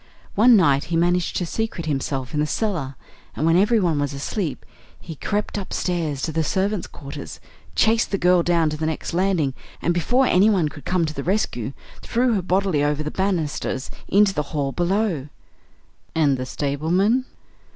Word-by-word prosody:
One 235 +4 +6
night 145 -8 +4
he 170 - -2
managed 175 +1 +1
to 180 - 0
secrete 220 -2 -3
himself 135 -3 -2
in 150 - 0
the 150 - +1
cellar, 160 -10 -2 0.4
and 155 - -1
when 165 0 +4
everyone 185 -5 +3
was 145 -1 -1
asleep, 150 +2 -3 0.3
he 165 - -8
crept 205 +6 -2
upstairs 170 -7 -2
to 160 - -1
the 160 +1 0
servants' 195 +4 -1
quarters, 140 -1 -9 0.4
chased 225 +1 +3
the 195 - 0
girl 180 -1 +4
down 170 -2 +2
to 155 - -4
the 155 +1 -1
next 160 +1 -3
landing, 175 -6 +1 0.3
and 175 - +1
before 245 +10 +2
anyone 190 -6 +4
could 145 -2 -12
come 180 -2 +1
to 155 - -4
the 140 - -5
rescue 140 - -1 0.3
threw 245 +1 +1
her 200 - +1
bodily 185 -4 +1
over 150 +1 0
the 150 - -4
banisters 165 -8 -2 0.2
into 200 0 +4
the 150 - 0 0.2
hall 140 -1 0
below." 175 -3 0 0.9
"And 150 -4 +3
the 130 0 -4
stableman 175 - +1
170 Hz, 170 wpm, -22 LUFS, 150-195 Hz, 0.9 s, One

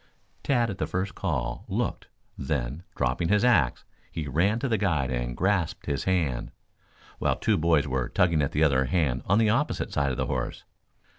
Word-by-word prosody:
Tad, 120 -5 +1
at 95 - -8
the - - -1
first 95 +1 -2
call, 60 -10 -2
looked; - - -2 0.3
then, 70 +1 -3
dropping 65 +7 0
his 105 +3 +3
axe, 80 - +3 0.3
he 80 -3 -4
ran 90 - +2
to 135 - -2
the 115 -3 +1
guide 75 -10 +1
and - - -3
grasped 95 -3 0
his 70 - -2
hand, 80 -10 0 0.7
while - - +1
two 110 - +1
boys 80 -4 +2
were 65 -2 -1
tugging 85 -4 +2
at 70 - 0
the 75 - +2
other 70 -3 +3
hand 65 -4 0
on 95 - +4
the 110 -1 +4
opposite 135 +7 -1
side 70 -1 +1
of 65 - -3
the - - 0
horse. - - -3
80 Hz, 190 wpm, -27 LUFS, 65-100 Hz, 0.7 s, on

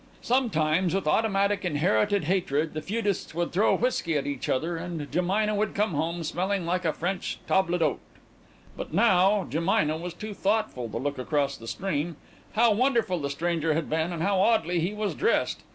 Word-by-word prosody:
Sometimes, 185 -8 +1
with 195 - -1
automatic 200 +2 +2
inherited 190 +5 +1
hatred, 160 -3 0
the 155 - -4
feudists 205 -4 -2
would 170 0 -1
throw 200 +5 +3
whiskey 175 -10 0
at 140 - -2
each 140 -2 -4
other, 165 +6 0
and 165 -1 -5
Jemina 195 +5 +1
would 210 +1 -1
come 210 0 +1
home 165 +2 -2
smelling 185 +4 -1
like 180 +1 -1
a 160 - +3
French 180 +4 -3
table 185 -2 +2
d'hôte. 160 -4 +1 0.8
But - - -6
now 195 -2 +4
Jemina 155 -1 +1
was 175 -1 -6
too 210 +3 -6
thoughtful 200 - -1
to - - -4
look 145 0 -3
across 140 +1 0
the 115 - -11
stream. 170 0 -2 0.4
How 230 +1 +4
wonderful 235 -6 +1
the 140 -2 -3
stranger 160 +1 0
had 160 -1 -2
been 160 +2 0
and 165 -2 -3
how 195 0 +2
oddly 180 -5 +2
he 170 +4 0
was 210 -1 -2
dressed! 445 - 0
180 Hz, 180 wpm, -27 LUFS, 160-200 Hz, 0.8 s, now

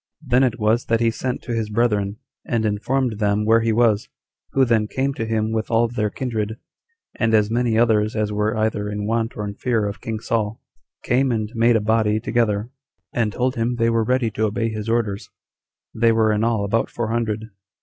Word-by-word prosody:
Then 125 -1 +3
it 125 -2 0
was 110 +3 +2
that 115 0 +1
he 115 -1 +2
sent 125 +2 -4
to 120 - -4
his 110 -2 -2
brethren, 105 -2 0 0.3
and 115 -2 -1
informed 110 +2 -1
them 105 0 +1
where 115 +1 +4
he 115 0 +1
was, 110 -2 +2 0.4
who 135 -1 +4
then 115 -3 +2
came 135 +4 -1
to 115 -4 -4
him 110 -1 0
with 110 -1 -2
all 115 0 +3
their 115 -3 -1
kindred, 110 -2 -3 0.6
and 115 -1 +3
as 105 0 +2
many 120 -1 +1
others 110 -2 +2
as 105 -1 -1
were 105 +1 0
either 110 -1 -1
in 105 0 -3
want 115 +1 -1
or 105 - -3
in 100 - -5
fear 115 -1 0
of 100 - -6
king 110 -1 -4
Saul, 110 -1 -2 0.4
came 130 +2 +2
and 110 -2 -2
made 115 0 +3
a 110 - +2
body 110 0 +2
together, 115 -1 0 0.4
and 115 -3 0
told 125 +3 0
him 120 +1 0
they 115 -1 +2
were 115 -1 +2
ready 125 0 +1
to 110 +2 0
obey 115 +2 -1
his 110 0 -5
orders; 110 -4 -1 0.6
they 115 +1 +3
were 110 -1 +3
in 105 +1 0
all 115 -3 +1
about 115 +3 0
four 120 -2 -3
hundred. 110 -1 -2
110 Hz, 210 wpm, -22 LUFS, 105-120 Hz, 0.6 s, where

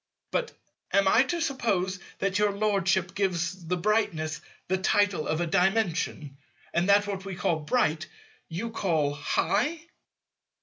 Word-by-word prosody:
But - - -1 0.4
am 200 -1 +4
I 225 - +6
to 345 +4 -2
suppose 205 - 0 0.2
that 195 +1 0
your 210 -1 +3
Lordship 195 -3 +1
gives 185 -2 -1
the 180 +2 0
brightness 170 -6 0 0.3
the 190 +1 0
title 200 -4 +2
of 160 +2 0
a - - +1
Dimension, 175 -6 0 0.4
and 175 +3 +1
that 205 +1 +5
what 195 -2 -4
we 195 -1 -6
call 165 -2 0
"bright" 155 -2 0 0.4
you 205 +8 -4
call 160 -9 0
"high"? 210 - 0
190 Hz, 140 wpm, -27 LUFS, 170-205 Hz, 0.4 s, I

